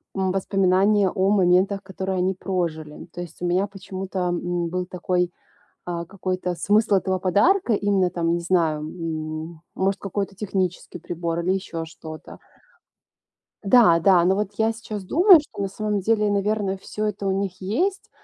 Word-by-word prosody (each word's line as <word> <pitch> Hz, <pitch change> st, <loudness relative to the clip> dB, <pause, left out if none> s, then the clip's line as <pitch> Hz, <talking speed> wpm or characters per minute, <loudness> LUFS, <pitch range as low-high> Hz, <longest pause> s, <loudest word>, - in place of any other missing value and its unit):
м, 190 Hz, -1 st, 0 dB
воспоминания 195 Hz, +1 st, +2 dB
о 190 Hz, +2 st, +1 dB
моментах, 195 Hz, 0 st, +3 dB
которые 190 Hz, 0 st, -4 dB
они 185 Hz, +1 st, +1 dB
прожили. 170 Hz, -5 st, -4 dB
То 175 Hz, -, -6 dB
есть 175 Hz, 0 st, -10 dB
у -, -, -1 dB
меня 185 Hz, +3 st, +1 dB
почему-то, 195 Hz, -1 st, -6 dB
м, 175 Hz, 0 st, -2 dB
был 180 Hz, +1 st, -2 dB
такой, 180 Hz, 0 st, -1 dB, 0.6 s
а, 170 Hz, -1 st, -3 dB
какой-то 185 Hz, -1 st, -3 dB
смысл 210 Hz, +4 st, +2 dB
этого 190 Hz, -1 st, 0 dB
подарка, 235 Hz, -, +3 dB
именно 200 Hz, -3 st, +2 dB
там, 170 Hz, -1 st, -1 dB
не 170 Hz, -, 0 dB
знаю, 170 Hz, -4 st, +1 dB
м, 155 Hz, 0 st, -5 dB
может 195 Hz, +1 st, 0 dB
какой-то 200 Hz, 0 st, -3 dB
технический 190 Hz, -4 st, -3 dB
прибор 170 Hz, 0 st, -3 dB
или 180 Hz, -, 0 dB
ещё 180 Hz, -4 st, -3 dB
что-то. 160 Hz, 0 st, -10 dB, 1.3 s
Да-да, 190 Hz, -5 st, +5 dB
но 190 Hz, +2 st, +3 dB
вот 210 Hz, -1 st, -1 dB
я 225 Hz, 0 st, +2 dB
сейчас 215 Hz, -3 st, -7 dB
думаю, 355 Hz, -, +7 dB
что 295 Hz, -8 st, -8 dB
на 195 Hz, -, -1 dB
самом 210 Hz, 0 st, -2 dB
деле, 210 Hz, +1 st, +2 dB
наверно, 200 Hz, -1 st, 0 dB
всё 210 Hz, +2 st, -5 dB
это 205 Hz, -1 st, -3 dB
у 195 Hz, -, +1 dB
них 190 Hz, -2 st, -4 dB
есть, 345 Hz, -, -1 dB
190 Hz, 160 wpm, -23 LUFS, 175-200 Hz, 1.3 s, думаю